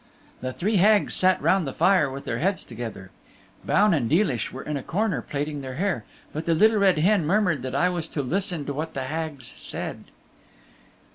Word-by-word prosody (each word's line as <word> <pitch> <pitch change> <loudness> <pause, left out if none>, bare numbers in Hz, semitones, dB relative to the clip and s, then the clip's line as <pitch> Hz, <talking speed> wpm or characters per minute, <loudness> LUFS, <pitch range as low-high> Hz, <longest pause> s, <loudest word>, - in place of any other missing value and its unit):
The 130 - -3
three 200 - 0
Hags 205 +2 +4
sat 185 0 +3
round 190 -5 +3
the 135 - -4
fire 185 -7 +3
with 135 +1 -7
their 115 - -2
heads 190 +4 0
together. 110 -6 -7 0.5
Baun 205 -1 +3
and 125 -8 0
Deelish 155 - +1
were 130 - -7
in 150 - -3
a 140 - -2
corner 195 +4 -1
plaiting 145 0 -4
their 130 -1 -6
hair, 175 - -1 0.3
but 155 +2 -5
the 165 - +3
Little 215 +5 +4
Red 190 -4 +4
Hen 185 +4 +3
murmured 175 -3 +1
that 130 +1 -4
I 175 - +3
was 175 -3 -2
to 145 - -3
listen 175 +1 -2
to 145 - -3
what 155 +3 -4
the 135 - -2
Hags 150 -2 -4
said. - - -5
160 Hz, 200 wpm, -25 LUFS, 135-190 Hz, 0.5 s, Hags